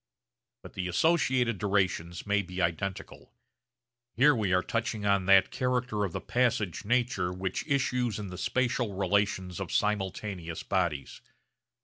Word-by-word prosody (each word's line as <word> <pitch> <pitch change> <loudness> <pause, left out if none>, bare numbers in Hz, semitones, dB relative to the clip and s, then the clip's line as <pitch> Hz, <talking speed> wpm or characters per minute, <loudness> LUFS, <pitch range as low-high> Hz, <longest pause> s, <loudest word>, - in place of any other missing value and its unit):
But - - -11
the 90 - -3
associated 125 - +2
durations 95 -4 -1
may 100 0 +2
be 90 -1 -7
identical. 85 +2 -3 0.8
Here 145 +5 +6
we 105 -5 0
are 90 0 +3
touching 115 -2 -2
on 100 -2 +2
that 95 -1 +6
character 125 -4 -1
of 95 - -4
the - - -3
passage 115 -8 0
nature 120 -6 0
which 95 +7 -4
issues 125 -6 0
in 105 -2 -5
the 90 - -8
spatial 120 -4 0
relations 95 -2 0
of - - -5
simultaneous 95 -4 -2
bodies. 85 -8 -2
100 Hz, 135 wpm, -29 LUFS, 90-120 Hz, 0.8 s, Here